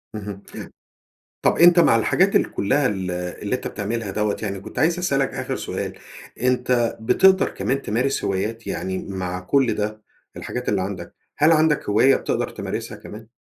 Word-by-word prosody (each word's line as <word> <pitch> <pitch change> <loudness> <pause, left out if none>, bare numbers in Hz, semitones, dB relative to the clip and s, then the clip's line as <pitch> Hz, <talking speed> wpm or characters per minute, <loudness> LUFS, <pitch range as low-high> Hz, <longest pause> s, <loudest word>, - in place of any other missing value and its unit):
اهم. 100 -2 -7 1.0
طب - - +3
أنت 175 +1 +7
مع 115 - +5
الحاجات 115 - +2
ال - - +2
كلها 135 +7 +1
ال 95 -4 -3
اللي 90 +5 -3
أنت 125 - -5
بتعملها 105 0 -4
دوّة 105 +1 -1
يعني 100 -3 -3
كنت 100 - -8
عايز 165 +5 +2
أسألك 135 -6 +1
آخر - - -3
سؤال، - - -4 0.5
أنت 125 -1 +1
بتقدر 190 +12 +4
كمان 135 +1 -2
تمارس 130 +5 -1
هوايات؟ 105 +4 -2
يعني 95 0 -3
مع 90 -1 -3
كل 125 +7 +2
ده، 105 +1 -3 0.4
الحاجات 125 0 -4
اللي 100 -2 +1
عندك، 95 0 -6 0.2
هل 155 +2 +5
عندك 155 -5 +2
هواية 130 +6 +5
بتقدر - - -1
تمارسها - - -5
كمان؟ 110 +1 -11
115 Hz, 160 wpm, -22 LUFS, 100-135 Hz, 1.0 s, أنت